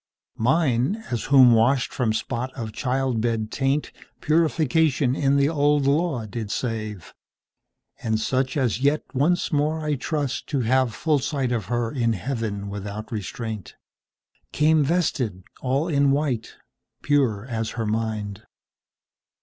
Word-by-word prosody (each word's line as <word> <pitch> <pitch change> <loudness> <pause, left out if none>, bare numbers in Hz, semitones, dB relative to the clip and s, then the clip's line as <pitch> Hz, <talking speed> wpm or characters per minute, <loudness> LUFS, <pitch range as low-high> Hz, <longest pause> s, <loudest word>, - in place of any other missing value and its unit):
Mine, 135 - +1
as 120 - -2
whom 130 -3 +7
washed 125 +4 +2
from 120 -4 0
spot 120 +3 -3
of 115 -4 -5
childbed 120 -4 -1
taintPurification 150 0 +1
in 140 -1 +2
the 140 0 +4
Old 145 -2 +2
Law 140 -4 +1
did 110 0 -5
save, 110 -5 -4 0.9
And 110 -1 0
such 130 +4 0
as 125 -3 0
yet 145 +2 +2
once 155 +7 +1
more 155 +1 0
I 150 - +1
trust 145 -1 -2
to 140 -4 -1
haveFull 130 +5 +1
sight 135 -3 -1
of 115 -6 -1
her 120 +1 -1
in 115 -4 +1
Heaven 105 -1 -3
without 100 +1 -6
restraint, 110 -1 -5 0.8
Came 155 0 +3
vested 135 - 0 0.2
all 135 +5 0
in 140 -4 +3
white, 135 -5 -1 0.5
pure 130 -8 +1
as 115 -3 -3
her 115 - -1
mind. 110 -2 -2
130 Hz, 125 wpm, -24 LUFS, 110-145 Hz, 0.9 s, whom